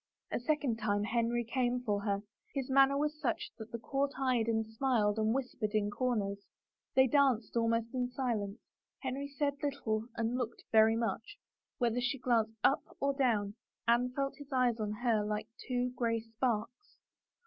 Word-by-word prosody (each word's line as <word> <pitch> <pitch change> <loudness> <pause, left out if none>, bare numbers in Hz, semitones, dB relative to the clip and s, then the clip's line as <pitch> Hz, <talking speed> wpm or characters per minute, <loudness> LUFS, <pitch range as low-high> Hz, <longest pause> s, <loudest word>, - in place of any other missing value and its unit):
A - - 0
second 275 -3 0
time 205 -1 +1
Henry 235 +2 +1
came 245 +1 0
for 205 -3 0
her, 200 -1 +1
and 200 - -7 0.3
his 270 -1 -2
manner 275 +1 +5
was 300 +1 -1
such 240 -5 -1
that 220 +1 -8
the 235 - -3
court 275 +4 -1
eyed 255 -4 +1
and 225 -1 +1
smiled 220 -2 +1
and 215 0 +2
whispered 235 -4 -2
in 205 -1 +1
comers. 205 -5 -1 0.6
They 260 - +7
danced 255 -5 +2
almost 230 0 +1
in 250 -1 0
silence. 230 -6 -2 0.4
Henry 270 +1 -3
said 285 0 -2
little 235 -6 -1
and 230 +2 -1
looked 235 -2 -4
very 220 0 +6
much. 225 -1 -2 0.4
Whether 240 0 +1
she 245 +3 0
glanced 225 -3 +1
up 275 - +4 0.2
or 280 0 +1
down, 220 -7 +1 0.3
Anne 240 +2 +4
felt 275 -1 -1
his 285 -1 -12
eyes 250 -3 +2
on 210 -1 -1
her 220 0 +1
like 210 0 -2 0.2
two 250 0 0
gray 230 -2 +1
sparks. 230 - -3
235 Hz, 170 wpm, -33 LUFS, 220-265 Hz, 0.6 s, They